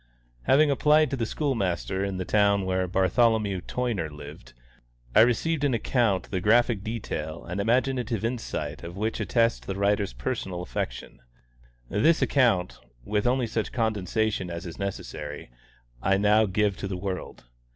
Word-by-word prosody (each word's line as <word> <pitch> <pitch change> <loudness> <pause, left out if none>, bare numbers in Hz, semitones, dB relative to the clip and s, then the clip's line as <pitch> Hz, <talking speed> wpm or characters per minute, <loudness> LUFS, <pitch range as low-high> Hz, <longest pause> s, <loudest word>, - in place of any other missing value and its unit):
Having 145 +2 +5
applied 150 +1 +4
to - - 0
the 115 -4 -2
school 145 +2 -1
master 95 -2 -1
in 100 -1 -2
the 95 - -3
town 100 -2 +3
where 95 0 0
Bartholomew 100 +1 +2
Toyner 115 -11 -2
lived, 75 -4 -11 0.6
I - - +8
received 145 +7 +2
an 140 -4 +2
account 110 -4 0
the 95 -2 -1
graphic 115 0 +3
detail 85 -8 -5
and 90 +4 -3
imaginative 120 -1 0
insight 120 0 -3
of 85 +2 -8
which 110 +2 -2
attest 115 -1 +1
the 95 - -3
writer's 100 - +1
personal 90 +8 -4
affection. - - -5 0.7
This 115 - +3
account, 115 -10 +2 0.3
with 105 +2 0
only 125 0 +2
such 110 -1 -2
condensation 110 -3 -1
as 85 0 -6
is 85 - -8
necessary, 75 -8 -6 0.5
I 95 +1 +2
now 105 +2 +4
give 105 0 +1
to 95 - -4
the 95 -1 -4
world. 95 0 -5
105 Hz, 150 wpm, -26 LUFS, 95-120 Hz, 0.7 s, I